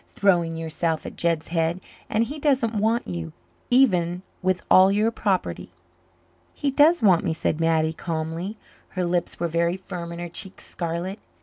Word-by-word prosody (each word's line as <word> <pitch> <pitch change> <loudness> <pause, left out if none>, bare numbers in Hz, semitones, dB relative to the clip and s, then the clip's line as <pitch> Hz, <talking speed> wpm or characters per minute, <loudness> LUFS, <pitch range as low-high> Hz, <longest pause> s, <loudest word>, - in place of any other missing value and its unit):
Throwing 170 -5 +1
yourself 160 0 -2
at - - -7
Jed's 170 -2 0
head 165 +1 0 0.3
and 220 +1 +2
he 290 +6 -5
doesn't 265 -6 +2
want 220 +3 +1
you, 85 -3 -5 0.4
even 180 -9 +3 0.2
with 185 0 0
all 190 +1 +7
your 210 +3 +2
property." 200 -5 -1 0.9
"He 285 -2 -1
does 300 +2 +4
want 185 -5 +5
me," 165 -3 -1
said 160 0 -1
Mattie 160 -1 +2
calmly. 165 +5 -4 0.4
Her 180 - +1
lips 175 0 -1
were 170 - 0
very 170 +2 0
firm 180 -3 -7
and 170 - -7
her 175 - -4
cheeks 190 +3 -9
scarlet. 175 +4 -4
175 Hz, 165 wpm, -24 LUFS, 165-210 Hz, 0.9 s, all